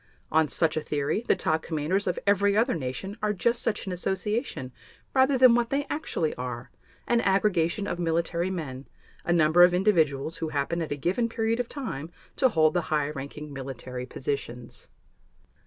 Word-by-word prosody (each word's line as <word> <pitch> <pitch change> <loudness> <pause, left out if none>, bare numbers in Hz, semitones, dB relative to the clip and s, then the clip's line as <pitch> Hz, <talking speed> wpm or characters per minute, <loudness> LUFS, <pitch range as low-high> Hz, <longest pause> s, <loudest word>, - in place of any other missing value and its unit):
On 160 0 +4
such 155 +3 +1
a 155 - 0
theory 150 +6 -1
the - - +4
top 160 -3 0
commanders 165 +6 -1
of 180 - 0
every 200 0 +3
other 235 +4 +3
nation 160 - -4
are 210 0 +1
just 235 +5 +1
such 225 - -1
an 190 - -4
association 190 - -2 0.4
rather 265 0 +4
than 255 -1 +7
what 235 0 +2
they 280 +1 0
actually 175 - -1
are, 125 -1 -5 0.3
an 235 -1 +2
aggregation 195 -2 +1
of 175 -3 -3
military 170 +1 0
men, 140 -8 -5 0.4
a - - 0
number 165 0 +5
of 180 0 +7
individuals 160 -7 +2
who 160 - -3
happen 150 +4 -1
at 160 - -4
a 145 - -1
given 190 - 0
period 225 +1 0
of 245 - -2
time 165 - -5 0.3
to 260 - +4
hold 155 -7 +3
the 175 - +2
high 150 -1 +1
ranking 145 +1 -7
military 130 -2 -6
positions. 130 -4 -5
170 Hz, 175 wpm, -27 LUFS, 145-210 Hz, 0.4 s, than